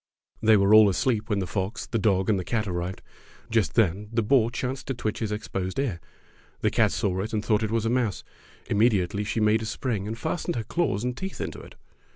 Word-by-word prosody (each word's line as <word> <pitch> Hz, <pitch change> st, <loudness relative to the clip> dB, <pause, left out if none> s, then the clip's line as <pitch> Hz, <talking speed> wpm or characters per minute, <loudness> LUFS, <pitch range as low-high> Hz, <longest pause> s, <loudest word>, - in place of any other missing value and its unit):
They 110 Hz, -1 st, +6 dB
were 100 Hz, +1 st, +4 dB
all 110 Hz, -1 st, +8 dB
asleep 110 Hz, +3 st, 0 dB
when 105 Hz, -, +1 dB
the 95 Hz, -, -1 dB
fox, 100 Hz, +3 st, -3 dB
the 115 Hz, -, -2 dB
dog, 95 Hz, -2 st, +2 dB
and 105 Hz, -3 st, +2 dB
the -, -, -3 dB
cat 110 Hz, +3 st, -1 dB
arrived. 90 Hz, +1 st, -4 dB, 0.5 s
Just 115 Hz, -2 st, +1 dB
then 105 Hz, -1 st, +1 dB
the 115 Hz, -1 st, +1 dB
boar 115 Hz, 0 st, +3 dB
chanced 125 Hz, +2 st, -4 dB
to 135 Hz, -, -2 dB
twitch 110 Hz, -3 st, -3 dB
his 110 Hz, -2 st, -2 dB
exposed 95 Hz, -3 st, -4 dB
ear. 125 Hz, -11 st, -1 dB, 0.6 s
The -, -, +2 dB
cat -, -, +3 dB
saw 95 Hz, -2 st, -1 dB
it 110 Hz, +3 st, -5 dB
and 105 Hz, -1 st, -1 dB
thought 105 Hz, -1 st, +2 dB
it 110 Hz, -, -1 dB
was 115 Hz, 0 st, 0 dB
a -, -, +1 dB
mouse. 120 Hz, -6 st, 0 dB, 0.4 s
Immedi 105 Hz, -4 st, +3 dB
ately 100 Hz, +2 st, -3 dB
she 105 Hz, +2 st, -2 dB
made 110 Hz, +1 st, +3 dB
a -, -, -4 dB
spring 110 Hz, -3 st, -3 dB
and 110 Hz, +1 st, -4 dB
fastened 170 Hz, +6 st, -2 dB
her 115 Hz, -, -2 dB
claws 110 Hz, -, -1 dB
and 125 Hz, 0 st, -2 dB
teeth 190 Hz, +8 st, -6 dB
into -, -, -4 dB
it. -, -, -13 dB
110 Hz, 230 wpm, -26 LUFS, 100-115 Hz, 0.6 s, all